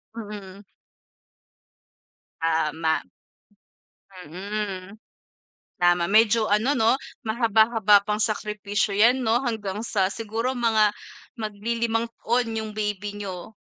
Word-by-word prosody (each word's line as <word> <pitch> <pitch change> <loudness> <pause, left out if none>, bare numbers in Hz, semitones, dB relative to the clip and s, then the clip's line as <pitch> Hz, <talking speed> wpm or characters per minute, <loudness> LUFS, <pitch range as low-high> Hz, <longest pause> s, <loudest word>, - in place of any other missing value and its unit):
Mm. 205 -3 -8 1.8
Tama. 160 0 0 1.3
Mm. 195 +2 -5 0.9
Tama. 175 0 +4
Medyo 220 +1 +4
ano, 220 +7 +2
'no, 225 +2 +4 0.3
mahaba-haba 220 -2 +4
pang 210 0 -1
sakripisyo 210 -1 -1
yan, 240 +5 +5
'no, 235 +1 +2
hanggang 210 -4 -3
sa 195 -3 +1
siguro 225 +3 -2
mga 220 -3 +3 0.4
maglilimang 225 +2 -2
taon 235 0 0
yung 220 -1 -4
baby 210 -1 -3
n'yo. 195 0 -7
210 Hz, 90 wpm, -24 LUFS, 200-225 Hz, 1.8 s, yan